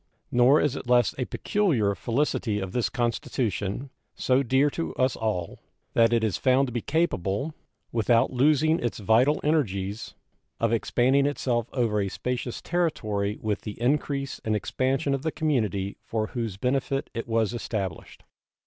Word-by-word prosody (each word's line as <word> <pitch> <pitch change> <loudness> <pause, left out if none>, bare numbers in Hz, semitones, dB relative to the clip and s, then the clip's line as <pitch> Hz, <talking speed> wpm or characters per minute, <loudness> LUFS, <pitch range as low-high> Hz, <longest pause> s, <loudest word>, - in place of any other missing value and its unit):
Nor 125 +5 +5
is 145 -2 +1
it - - -7
less 120 -2 +4
a 125 - 0
peculiar 140 - +1
felicity 115 -2 -1
of 95 -2 -4
this 125 +1 0
Constitution, 120 -2 -2 0.2
so 130 +1 +2
dear 135 +3 +2
to 165 - -4
us 130 0 +1
all, 105 -6 -3 0.3
that 115 0 +4
it 115 -1 +2
is 110 -4 0
found 130 +1 +3
to - - -5
be 120 0 -2
capable, 140 - -1 0.4
without 115 +2 +2
losing 155 +5 +3
its 120 - -2
vital 115 +8 +3
energies, 105 -9 -1 0.4
of 115 0 +1
expanding 130 +4 +2
itself 120 -5 -1
over 115 -5 +1
a 100 - -1
spacious 125 +3 -4
territory 110 -13 -1
with 105 -2 -1
the 105 -1 -7
increase 140 +2 -1
and 110 -1 0
expansion 130 +6 0
of 135 - -1
the 160 +2 -1
community 110 - -1
for 110 -1 -2
whose 115 -4 -4
benefit 135 +3 -1
it 115 0 -4
was 115 -1 +1
established. 100 -7 -5
120 Hz, 155 wpm, -26 LUFS, 110-140 Hz, 0.4 s, Nor